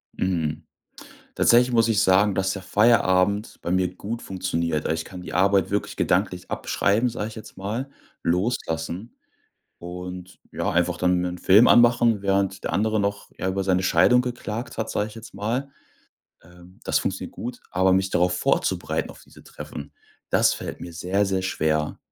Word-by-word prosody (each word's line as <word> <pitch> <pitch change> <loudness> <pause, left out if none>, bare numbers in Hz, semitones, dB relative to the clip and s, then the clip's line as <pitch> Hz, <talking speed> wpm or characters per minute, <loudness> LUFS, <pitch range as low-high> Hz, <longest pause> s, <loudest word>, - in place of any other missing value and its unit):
Mhm. 85 -5 -1 0.7
Tatsächlich 125 +1 +4
muss 115 -1 +3
ich 105 -3 +2
sagen, 100 +1 +4
dass 95 0 +1
der 95 - -6
Feierabend 100 -1 +2
bei 85 - -3
mir 90 -1 +1
gut 115 +5 -5
funktioniert. 85 -4 -2
Also, - - +1
ich 80 - -5
kann 90 -2 -9
die - - -8
Arbeit 95 0 +3
wirklich 100 +1 -2
gedanklich 90 -1 0
abschreiben, 110 +5 +1
sag 110 -2 -4
ich 110 - -10
jetzt 110 - -11
mal, 110 +8 -4 0.3
loslassen 90 0 -2 0.6
und, 90 +1 -8
ja, - - -1
einfach 85 0 +1
dann 90 0 +2
mir 90 - -1
'n 90 0 -6
Film 100 +7 +6
anmachen, 120 -3 +5
während 95 -1 0
der - - -2
andere 110 +1 +1
noch, 100 0 -3
ja, 95 - -2
über 95 +1 -1
seine 95 -1 +2
Scheidung 95 +8 +4
geklagt 120 -2 -5
hat, 110 - -2
sag 105 - -1
ich - - -13
jetzt 115 -3 -11
mal. 120 +7 -2 0.7
Ähm, 90 +2 -18
das - - +2
funktioniert - - -4
gut. 120 +1 -6
Aber 95 +1 +3
mich 95 0 +1
darauf 90 +1 +2
vorzubereiten - - 0
auf - - -15
diese - - -17
Treffen, 75 0 -9 0.4
das - - +4
fällt - - -7
mir 85 - -8
sehr, 90 +4 0
sehr 95 -1 -1
schwer, 80 -4 -1
95 Hz, 175 wpm, -24 LUFS, 90-110 Hz, 0.7 s, Film